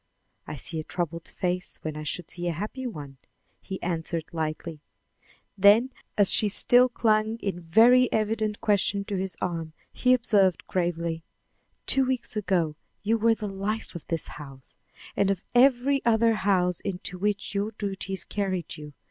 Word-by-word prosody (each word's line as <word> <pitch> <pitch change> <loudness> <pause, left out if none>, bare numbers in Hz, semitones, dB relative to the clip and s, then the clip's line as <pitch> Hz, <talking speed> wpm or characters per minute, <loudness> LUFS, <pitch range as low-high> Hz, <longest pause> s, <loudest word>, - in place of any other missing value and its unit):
"I - - -5
see 160 +3 -2
a - - -4
troubled 170 0 -4
face 180 -1 -2
when 155 -1 -4
I 155 - -5
should 155 +3 -4
see 175 0 -4
a 170 - 0
happy 215 - -5
one," 145 - -8 0.4
he 190 -1 -6
answered 165 -2 -2
lightly; 155 0 -4 0.7
then, 205 +6 +5 0.3
as 205 -2 +6
she 210 - +3
still 245 +5 +5
clung 220 -1 +1
in 195 -5 -4
very 235 +9 +5
evident 215 -1 -1
question 200 -1 +1
to 200 - -3
his 190 0 -3
arm, 165 -3 -3 0.2
he 255 0 +4
observed 205 -7 +2
gravely: 170 -2 -2 0.6
"Two 270 - +4
weeks 255 -3 -2
ago 180 -7 0 0.3
you 225 +2 +1
were 225 +1 +4
the 215 - -5
life 200 +3 -4
of 170 - -9
this 165 -2 -1
house, 135 -3 -12 0.4
and 200 - +2
of 195 -2 -1
every 265 +2 +4
other 230 0 +3
house 185 -4 +1
into 185 -1 -5
which 205 +1 -1
your 200 +1 -1
duties 195 -3 -4
carried 185 -5 -3
you. 150 -1 -10
195 Hz, 160 wpm, -26 LUFS, 170-220 Hz, 0.7 s, as